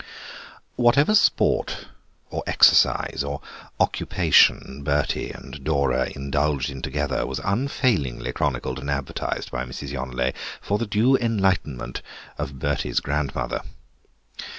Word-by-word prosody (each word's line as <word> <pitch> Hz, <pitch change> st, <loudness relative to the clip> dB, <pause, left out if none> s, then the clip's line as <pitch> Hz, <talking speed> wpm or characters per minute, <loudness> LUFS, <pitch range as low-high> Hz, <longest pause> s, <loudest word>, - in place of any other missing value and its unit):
Whatever 140 Hz, -, +4 dB
sport 215 Hz, -, +2 dB, 0.5 s
or -, -, -3 dB
exercise 70 Hz, -, +4 dB
or 70 Hz, 0 st, -4 dB, 0.4 s
occupation 70 Hz, +2 st, +3 dB
Bertie 75 Hz, 0 st, 0 dB
and 70 Hz, -, -10 dB
Dora 70 Hz, -2 st, +1 dB
indulged 70 Hz, 0 st, -1 dB
in 65 Hz, -1 st, -8 dB
together -, -, -1 dB
was 65 Hz, -1 st, -3 dB
unfailingly 100 Hz, -, 0 dB
chronicled 65 Hz, 0 st, -2 dB
and 70 Hz, +2 st, -6 dB
advertised 70 Hz, -1 st, -3 dB
by 60 Hz, -, -2 dB
Mrs. 65 Hz, +2 st, -7 dB
Yonelet 65 Hz, -2 st, -2 dB, 0.3 s
for 105 Hz, +1 st, -1 dB
the 115 Hz, -, -2 dB
due 115 Hz, +6 st, +3 dB
enlightenment 95 Hz, -, -1 dB, 0.4 s
of 70 Hz, -, -4 dB
Bertie's 70 Hz, +2 st, 0 dB
grandmother. 70 Hz, -1 st, -2 dB
70 Hz, 110 wpm, -24 LUFS, 65-105 Hz, 0.5 s, Whatever